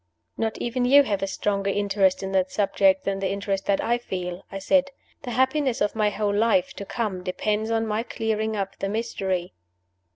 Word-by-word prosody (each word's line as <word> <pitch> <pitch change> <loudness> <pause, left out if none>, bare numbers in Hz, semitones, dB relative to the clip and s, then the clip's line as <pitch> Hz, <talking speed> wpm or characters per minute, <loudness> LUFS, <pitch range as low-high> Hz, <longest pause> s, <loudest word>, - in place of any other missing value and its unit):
"Not 225 -1 -2
even 245 +1 -1
you 280 +3 +7
have 200 -6 -1
a 195 - 0
stronger 200 0 -1
interest 195 -1 +1
in 190 - -3
that 185 -1 +1
subject 285 +8 +2
than 195 0 -1
the 195 -1 -1
interest 195 0 -2
that 200 - +2
I 240 +1 +1
feel," 180 -5 -5
I 195 - -4
said. 275 +8 +2 0.3
"The 255 - -6
happiness 260 +1 +1
of 205 +1 0
my 215 -1 +2
whole 205 0 -1
life 205 -4 +2
to 200 - -5
come 205 -4 -3
depends 210 +4 -1
on 225 0 +1
my 215 0 -1
clearing 220 -2 -2
up 195 -1 -3
the 195 - -2
mystery." 190 -5 -2
205 Hz, 195 wpm, -25 LUFS, 195-230 Hz, 0.3 s, you